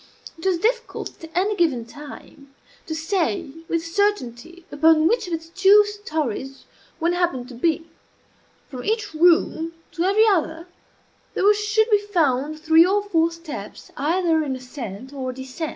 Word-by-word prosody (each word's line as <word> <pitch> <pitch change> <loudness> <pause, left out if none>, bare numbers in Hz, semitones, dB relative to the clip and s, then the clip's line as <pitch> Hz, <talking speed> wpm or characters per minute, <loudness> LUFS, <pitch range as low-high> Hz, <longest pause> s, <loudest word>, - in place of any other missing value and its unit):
It 330 +3 -4
was 370 -2 +2
difficult, 470 -1 -2
at 325 - -8
any 400 +4 +1
given 290 -11 +1
time, 280 +1 -12 0.3
to 315 - -3
say 340 0 -1 0.2
with 330 0 -1
certainty 340 - -2
upon 315 +1 +4
which 460 0 +1
of 350 - -4
its 325 0 -9
two 390 +3 +6
stories 305 - -4 0.3
one 340 +1 +1
happened 345 -9 -1
to - - -10
be. 325 +6 0 0.8
From 255 -3 -8
each 430 -3 -1
room 330 0 +3 0.2
to 335 - -2
every 405 +4 +4
other 335 -4 0 0.7
there - - 0
were 415 - +7
sure 425 +1 +1
to 460 - -10
be 415 - +6
found 310 -7 0
three 320 +1 +6
or 400 +3 +1
four 335 -5 +2
steps 335 -2 -9
either 330 +2 +1
in 275 -4 -2
ascent 255 -2 -8
or 260 -2 -4
descent. 260 +5 -6
330 Hz, 160 wpm, -22 LUFS, 290-385 Hz, 0.8 s, were